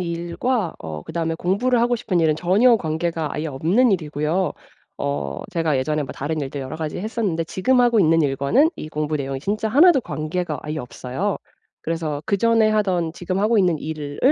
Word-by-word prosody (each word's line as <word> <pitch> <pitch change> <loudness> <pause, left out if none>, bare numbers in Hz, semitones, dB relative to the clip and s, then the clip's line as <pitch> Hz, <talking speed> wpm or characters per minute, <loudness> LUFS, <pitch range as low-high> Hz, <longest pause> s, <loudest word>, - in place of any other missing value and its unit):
일과 175 +5 -2
어 80 -1 -7
그다음에 165 0 -2
공부를 230 +9 +1
하고 240 0 +2
싶은 215 -6 -1
일은 160 -2 +3
전혀 205 +9 +4
관계가 160 -3 -2
아예 155 +2 -2
없는 175 - +2
일이고요. 155 +1 -1 0.4
어 70 -1 -3
제가 165 -4 +1
예전에 150 +3 0
뭐 135 - -6
다른 155 +3 -3
일들 140 0 -4
여러 130 +4 -6
가지 155 -1 -4
했었는데 200 -5 -1
지금 250 +10 +2
하고 235 -3 +4
있는 165 -2 +4
일과는 140 - +2
이 155 - -7
공부 150 0 -2
내용이 135 -1 -4
진짜 210 +7 -1
하나도 295 +5 +6
관계가 155 -4 -3
아예 155 +1 -4
없어요. 130 +10 -3 0.5
그래서 160 -3 -3
그전에 220 +1 +3
하던 185 -6 +1
지금 185 +2 -3
하고 215 +2 +3
있는 180 -5 +2
일을 150 -2 -6
165 Hz, 385 characters per minute, -22 LUFS, 150-205 Hz, 0.5 s, 하나도